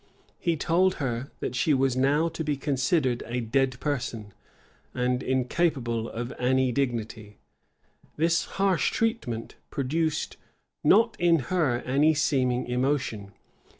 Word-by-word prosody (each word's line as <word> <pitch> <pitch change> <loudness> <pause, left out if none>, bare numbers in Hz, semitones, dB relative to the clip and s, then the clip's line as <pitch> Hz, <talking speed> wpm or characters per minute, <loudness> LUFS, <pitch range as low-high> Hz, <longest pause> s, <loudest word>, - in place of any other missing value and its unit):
He 170 -2 0
told 180 +5 +2
her, 130 -1 -3
that - - -3
she 130 +4 +2
was 135 -1 +1
now 140 +5 +2
to 165 0 -5
be 150 -2 -1
considered 135 -1 0
as 120 - -6
a - - +1
dead 130 +2 0
person, 120 -8 -3 0.6
and 125 0 0
incapable 125 -3 0
of 120 +2 -5
any 130 +1 +2
dignity.[] 115 -5 -3 0.8
This 165 +2 +2
harsh 195 -3 +2
treatment 220 - -2
produced 155 +3 -1 0.5
not 230 0 +4
in 170 -1 +4 0.2
her 140 -9 +1
any 145 +5 +3
seeming 130 -4 +1
emotion. 125 -6 -1
130 Hz, 125 wpm, -27 LUFS, 125-155 Hz, 0.8 s, not